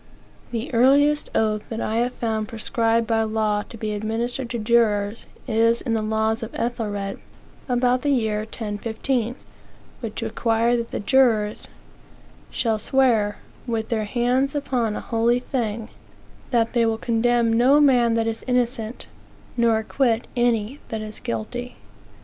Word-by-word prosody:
The 240 Hz, +4 st, -4 dB
earliest 285 Hz, +5 st, +4 dB
oath 215 Hz, -1 st, +1 dB
that 225 Hz, -, -4 dB
I 220 Hz, 0 st, -1 dB
have 245 Hz, +2 st, +1 dB
found 220 Hz, -3 st, -2 dB
prescribed 230 Hz, +1 st, 0 dB
by 225 Hz, 0 st, +1 dB
law 215 Hz, -1 st, 0 dB
to 230 Hz, -, -9 dB
be 215 Hz, -1 st, -3 dB
administered 230 Hz, +4 st, -3 dB
to 240 Hz, -, -3 dB
jurors 215 Hz, -2 st, +1 dB, 0.2 s
is 230 Hz, 0 st, +3 dB
in 235 Hz, -, -2 dB
the 220 Hz, -, +1 dB
laws 220 Hz, +1 st, 0 dB
of 225 Hz, -, -4 dB
Ethelred, 205 Hz, -4 st, -3 dB, 0.5 s
(about 250 Hz, 0 st, +2 dB
the 290 Hz, -, 0 dB
year 220 Hz, -6 st, +1 dB
1015,) 220 Hz, +3 st, -3 dB, 0.6 s
which 225 Hz, -1 st, -5 dB
require 230 Hz, +1 st, +1 dB
that 235 Hz, -1 st, -2 dB
the -, -, -4 dB
jurors 220 Hz, -3 st, +2 dB, 0.8 s
"shall 225 Hz, -3 st, 0 dB
swear, 225 Hz, -4 st, +2 dB, 0.3 s
with 225 Hz, -2 st, -2 dB
their 220 Hz, -2 st, 0 dB
hands 250 Hz, +5 st, +1 dB
upon 245 Hz, -6 st, -1 dB
a -, -, -4 dB
holy 235 Hz, +1 st, +1 dB
thing, 230 Hz, -4 st, -3 dB, 0.6 s
that 230 Hz, -2 st, +1 dB
they 240 Hz, -2 st, +3 dB
will 225 Hz, -1 st, +1 dB
condemn 235 Hz, 0 st, +2 dB
no 255 Hz, +5 st, +5 dB
man 245 Hz, -5 st, +4 dB
that 225 Hz, -1 st, +1 dB
is 225 Hz, 0 st, -3 dB
innocent, 245 Hz, -2 st, -1 dB, 0.5 s
nor 235 Hz, -2 st, +3 dB
acquit 230 Hz, +1 st, 0 dB
any 240 Hz, +1 st, +1 dB
that 220 Hz, -1 st, -3 dB
is 215 Hz, 0 st, -7 dB
guilty." 245 Hz, -, -5 dB
230 Hz, 145 wpm, -23 LUFS, 220-245 Hz, 0.8 s, no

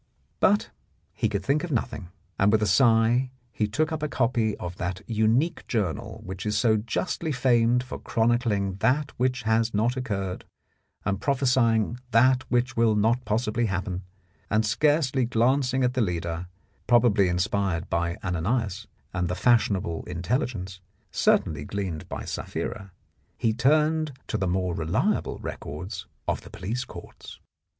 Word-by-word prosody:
But 205 Hz, +2 st, +3 dB, 0.4 s
he 110 Hz, -, 0 dB
could 100 Hz, -2 st, -3 dB
think 145 Hz, +3 st, +1 dB
of 175 Hz, -, -3 dB
nothing, 105 Hz, -7 st, -2 dB, 0.3 s
and 100 Hz, +1 st, +4 dB
with 110 Hz, 0 st, +3 dB
a -, -, +3 dB
sigh 115 Hz, +3 st, +4 dB, 0.2 s
he 105 Hz, -2 st, 0 dB
took 155 Hz, +10 st, 0 dB
up 160 Hz, -1 st, -3 dB
a 155 Hz, -, 0 dB
copy 115 Hz, -5 st, 0 dB
of 90 Hz, 0 st, -6 dB
that 90 Hz, +1 st, -3 dB
unique 115 Hz, +9 st, +1 dB
journal 100 Hz, -, -2 dB
which 95 Hz, 0 st, -6 dB
is 105 Hz, 0 st, 0 dB
so 110 Hz, -1 st, +3 dB
justly 135 Hz, -, -2 dB
famed 125 Hz, -2 st, +3 dB
for 125 Hz, -, -7 dB
chronicling 110 Hz, -5 st, +1 dB
that 135 Hz, +7 st, +1 dB
which 125 Hz, 0 st, 0 dB
has 110 Hz, 0 st, +1 dB
not 115 Hz, +4 st, +2 dB
occurred 100 Hz, -8 st, -3 dB, 0.6 s
and 100 Hz, 0 st, -1 dB
prophesying 125 Hz, -4 st, +2 dB
that 130 Hz, +3 st, +4 dB
which 120 Hz, 0 st, +1 dB
will 115 Hz, -2 st, +3 dB
not 115 Hz, +4 st, +2 dB
possibly 110 Hz, +2 st, 0 dB
happen, 95 Hz, -1 st, -3 dB, 0.5 s
and 110 Hz, +2 st, +2 dB
scarcely 135 Hz, +3 st, +2 dB
glancing 125 Hz, +2 st, +2 dB
at 125 Hz, 0 st, +2 dB
the 130 Hz, -, +1 dB
leader, 85 Hz, -3 st, -2 dB, 0.4 s
probably 115 Hz, -5 st, +4 dB
inspired 90 Hz, 0 st, 0 dB
by 85 Hz, 0 st, -1 dB
Ananias, 100 Hz, +3 st, -1 dB, 0.3 s
and 90 Hz, -1 st, 0 dB
the 90 Hz, -, -2 dB
fashionable 100 Hz, -6 st, +2 dB
intelligence, 95 Hz, -, -3 dB, 0.3 s
certainly 75 Hz, -2 st, +2 dB
gleaned 95 Hz, -3 st, -4 dB
by -, -, -5 dB
Sapphira, 100 Hz, -1 st, -5 dB, 0.5 s
he 110 Hz, -, +1 dB
turned 155 Hz, +5 st, +2 dB
to -, -, -2 dB
the 95 Hz, -, 0 dB
more 90 Hz, 0 st, 0 dB
reliable 80 Hz, -1 st, 0 dB
records 95 Hz, +6 st, -6 dB, 0.2 s
of -, -, 0 dB
the -, -, -13 dB
police 115 Hz, +7 st, -4 dB
courts. -, -, -11 dB
110 Hz, 145 wpm, -26 LUFS, 95-125 Hz, 0.6 s, and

